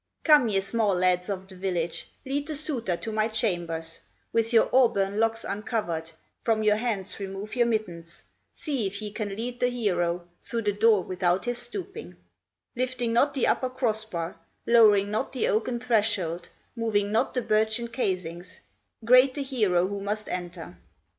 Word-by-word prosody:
"Come, 300 -7 +6
ye 195 -2 +2
small 205 0 +1
lads 180 +1 +1
of 190 -1 -4
the 190 - -10
village, 180 -3 -2 0.2
Lead 280 +2 -2
the 310 - -3
suitor 250 - -1
to 225 - -5
my 215 0 +1
chambers, 175 -7 -2 0.3
With 230 0 +1
your 230 -2 +5
auburn 215 -6 +3
locks 225 0 +1
uncovered, 200 -6 -3 0.3
From 220 -2 +1
your 210 0 +4
hands 215 -5 -3
remove 195 +3 -6
your 240 -1 +3
mittens, 175 -7 -4 0.3
See 270 - -2
if 200 +1 -5
ye 210 -1 -5
can 205 -2 -4
lead 245 +3 -5
the 245 - +3
hero 175 -8 -1
Through 230 -1 -3
the 205 - +2
door 210 -1 +4
without 180 +1 0
his 245 0 -1
stooping, 190 - -6 0.6
Lifting 245 -2 -1
not 280 +4 +3
the 265 - +2
upper 255 - +1
cross 235 -4 +1
bar, 170 -6 -5 0.3
Lowering 210 -4 +5
not 220 +6 -2
the 255 - 0
oaken 235 +3 0
threshold, 205 -8 0 0.3
Moving 210 -3 0
not 220 - +1
the 250 - 0
birchen 220 +2 +1
casings, 185 -7 -4 0.4
Great 255 +2 +6
the 285 - -2
hero 210 -10 +1
who 200 +1 -4
must 210 +2 -3
enter. 175 - -6
215 Hz, 165 wpm, -27 LUFS, 185-235 Hz, 0.6 s, Come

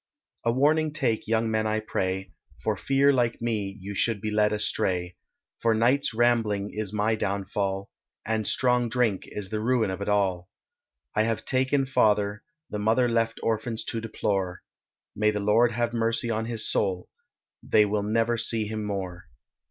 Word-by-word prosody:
A 115 - +2
warning 150 +4 +2
take 120 -8 -1
young 110 0 +1
men 110 0 +1
I 110 0 0
pray, 95 -3 -2 0.3
For - - +1
fear 140 +1 +3
like 120 -3 +1
me 105 -4 -2
you 100 +2 -6
should 110 +1 0
be 110 +1 -3
led 105 0 +3
astray, 90 -4 -1 0.4
For 115 -1 +2
nights 125 +6 +2
rambling 110 -4 +1
is 105 -2 -2
my 105 +1 +1
downfall, 100 -1 -2 0.4
And 110 -1 -1
strong 125 -2 +2
drink 115 -4 0
is 100 -2 -5
the 110 - -2
ruin 115 -3 +1
of 95 - -5
all; 95 -3 +1 0.6
I 105 - +2
have 115 0 -1
taken 130 +1 +2
father, 105 -5 +2 0.3
The 105 - -3
mother 115 +4 +3
left 115 -1 0
orphans 110 0 -1
to 115 - -3
deplore, 100 -5 -2 0.5
May 105 +1 +2
the 105 -1 -1
Lord 110 +4 +3
have 120 +1 -1
mercy 115 0 0
on 110 0 -1
his 115 -1 -2
soul, 95 -3 0 0.5
They 105 - +4
will 105 0 0
never 115 +3 +1
see 110 0 0
him 110 0 -4
more. 95 -3 -5
110 Hz, 165 wpm, -26 LUFS, 100-115 Hz, 0.6 s, They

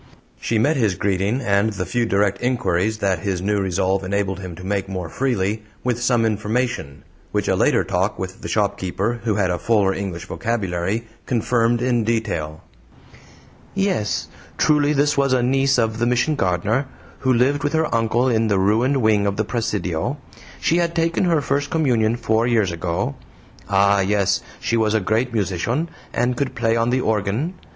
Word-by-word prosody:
She 115 - 0
met 145 +8 +2
his 110 -7 +1
greeting, 100 +7 0
and 105 -1 +1
the 90 -2 -3
few 115 +6 0
direct 100 -1 +1
inquiries 110 -4 0
that 95 -4 0
his 95 -1 -2
new 100 +2 0
resolve 95 0 0
enabled 95 0 -1
him 90 -3 -7
to 90 - -11
make 100 0 -2
more 90 -4 -4
freely, 110 -3 -1 0.2
with 120 -1 -1
some 120 -1 +2
information 110 - -2 0.3
which - - -1
a - - +2
later - - +3
talk 95 +3 -1
with 95 0 -6
the - - -5
shopkeeper, 100 +2 -1
who 110 -3 +1
had 95 -3 +1
a 90 - -2
fuller 100 -1 +2
English 90 -5 -5
vocabulary, 100 0 -2 0.2
confirmed 120 0 +1
in 120 -2 +1
detail. 100 -9 -2 1.1
"YES! 195 - 0 0.3
truly 150 -1 +3
this 145 0 +2
was 140 -1 +2
a 125 -1 +2
niece 135 +2 +2
of 110 -2 0
the 120 - +2
Mission 125 +6 +2
gardener, 105 - 0 0.3
who 130 - +1
lived 135 +4 +2
with 145 - -1
her 160 0 +2
uncle 115 +2 +2
in 115 -2 +2
the 100 -2 +2
ruined 115 +7 +2
wing 105 -2 +3
of 100 0 -1
the 110 - 0
presidio. 105 - -2 0.4
She 165 - +2
had 170 -1 0
taken 165 +2 +1
her 165 -4 +2
first 140 0 -1
communion 120 -8 +2
four 115 0 +1
years 110 -6 +2
ago. 85 -2 -2 0.6
Ah, 100 0 +4
yes, 100 -2 +1 0.2
she 115 - -1
was 110 -1 +2
a - - +4
great 110 +5 0
musician, 110 - -1 0.2
and 125 +1 0
could 130 0 -2
play 115 -1 +1
on 115 +1 +1
the 130 +1 +1
organ. 110 - -1
110 Hz, 175 wpm, -21 LUFS, 95-125 Hz, 1.1 s, Ah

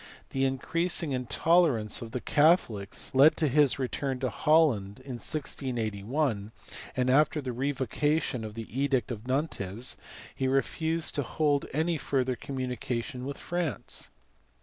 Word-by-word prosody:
The 135 0 +1
increasing 165 +4 0
intolerance 130 -2 +2
of 115 - -6
the 125 - -3
Catholics 145 - +2
led 140 +4 +6
to 155 - +2
his 145 0 +4
return 130 +1 -2
to 130 -3 0
Holland 130 -10 +2
in 130 -3 -5
1681, 120 -4 -2 0.5
and 130 0 +2
after 150 +3 +4
the 130 -4 -4
revocation 135 +1 0
of 110 -1 -7
the 115 -1 -5
edict 135 -4 +1
of 115 +1 -6
Nantes 125 - 0 0.4
he 130 - -1
refused 160 +5 0
to 145 - 0
hold 145 +2 0
any 160 +2 0
further 130 -1 0
communication 125 0 -4
with 140 0 -5
France. 175 -5 -4
135 Hz, 130 wpm, -29 LUFS, 120-150 Hz, 0.5 s, led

